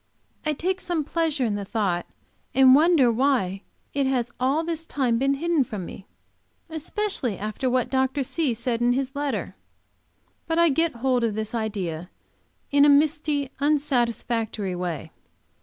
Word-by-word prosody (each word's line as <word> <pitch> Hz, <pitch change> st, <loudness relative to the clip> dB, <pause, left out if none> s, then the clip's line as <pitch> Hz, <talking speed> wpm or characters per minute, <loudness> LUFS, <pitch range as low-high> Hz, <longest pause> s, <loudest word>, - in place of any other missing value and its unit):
I 305 Hz, -, +2 dB
take 370 Hz, +5 st, -2 dB
some 345 Hz, -3 st, -1 dB
pleasure 310 Hz, -3 st, 0 dB
in 220 Hz, -, 0 dB
the 205 Hz, 0 st, -3 dB
thought, 195 Hz, -4 st, -1 dB, 0.5 s
and 265 Hz, -1 st, +7 dB
wonder 300 Hz, -4 st, +5 dB
why 230 Hz, -7 st, +1 dB, 0.3 s
it 280 Hz, -1 st, +1 dB
has 245 Hz, -3 st, 0 dB
all 270 Hz, +6 st, +1 dB
this 330 Hz, -1 st, -4 dB
time 245 Hz, -5 st, 0 dB
been 275 Hz, +1 st, +2 dB
hidden 330 Hz, 0 st, +1 dB
from 210 Hz, -6 st, -6 dB
me, 190 Hz, -, -10 dB, 0.6 s
especially 320 Hz, -, -2 dB
after 215 Hz, +5 st, -2 dB
what 250 Hz, -1 st, 0 dB
Dr. 265 Hz, +1 st, +1 dB
C. 275 Hz, -2 st, -1 dB
said 235 Hz, +1 st, -2 dB
in 240 Hz, 0 st, +3 dB
his 270 Hz, +1 st, -2 dB
letter. 285 Hz, -1 st, -2 dB, 0.9 s
But 325 Hz, 0 st, 0 dB
I 340 Hz, 0 st, +5 dB
get 325 Hz, +3 st, +1 dB
hold 250 Hz, 0 st, +1 dB
of 220 Hz, -3 st, 0 dB
this 220 Hz, +1 st, -4 dB
idea 190 Hz, -7 st, -3 dB, 0.6 s
in 285 Hz, 0 st, +5 dB
a 295 Hz, -, +7 dB
misty, 290 Hz, -1 st, +2 dB
unsatisfactory 240 Hz, -8 st, 0 dB
way. 175 Hz, -4 st, -4 dB
265 Hz, 155 wpm, -25 LUFS, 225-300 Hz, 0.9 s, and